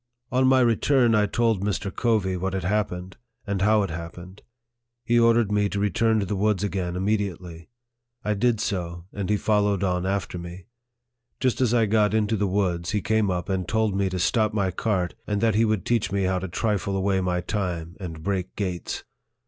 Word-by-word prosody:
On 130 0 +3
my 130 0 +5
return, 120 +1 +3
I 105 -1 +3
told 115 -2 +1
Mr. 100 -1 -2
Covey 110 -6 +1
what 95 +1 -2
had 95 - -2
happened, 95 -2 -2 0.3
and 100 -2 -2
how 105 +1 +4
it 95 - -3
hap 85 0 -6
pened. 90 +2 -11 0.7
He 120 +1 +3
ordered 115 -2 +4
me 105 0 +2
to 100 - -3
return 110 +2 +2
to 100 - -1
the 100 - -2
woods 105 0 +1
again 95 -3 -2
immediately. 90 -4 -2 0.6
I 105 - +1
did 115 +2 +1
so, 85 -5 -3
and 100 -1 -4
he 105 - +3
followed 105 -2 +1
on 90 -1 0
after 95 -2 -2
me. 85 +1 -9 0.7
Just 130 -1 0
as 125 -3 +3
I 120 -2 +3
got 105 0 +2
into 110 0 +1
the 100 -1 0
woods, 90 -3 0
he 105 -1 0
came 110 0 +2
up 90 -1 -2
and 95 -3 -2
told 110 -2 +1
me 100 -1 +1
to 95 - -3
stop 110 +4 +1
my 95 -3 +1
cart, 90 -2 -1
and 105 -1 0
that 115 +1 +2
he 110 +3 +3
would 110 -5 0
teach 115 -4 +1
me 100 -1 0
how 95 0 +1
to 95 - -4
trifle 100 0 -1
away 95 0 +1
my 90 -1 0
time, 90 -3 -3
and 80 -4 -7
break 95 -1 -2
gates. 90 -4 -3
100 Hz, 205 wpm, -25 LUFS, 90-110 Hz, 0.7 s, my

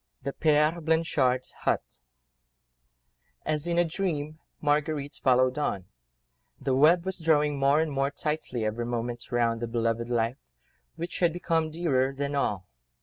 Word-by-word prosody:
THE 140 - -3
PÈRE 155 +2 +2
BLANCHARD'S 150 -6 +1
HUT 60 - -2 1.4
As 155 +1 -1
in 170 0 0
a 175 - +4
dream, 155 -3 -3 0.2
Marguerite 150 -1 -1
followed 130 +1 +3
on; 100 -10 -1 0.7
the 135 -1 -1
web 160 +6 +5
was 190 -1 -3
drawing 150 -3 +2
more 140 +2 +4
and 160 -1 0
more 135 0 +1
tightly 145 -5 -3
every 115 +2 -2
moment 120 0 -4
round 115 -1 +1
the 120 - -2
beloved 115 0 -1
life, 120 +1 0 0.6
which 170 +1 -5
had 175 -2 +3
become 165 -2 0
dearer 140 -5 0
than 140 +1 -2
all. 105 -9 -1
145 Hz, 145 wpm, -27 LUFS, 125-160 Hz, 1.4 s, web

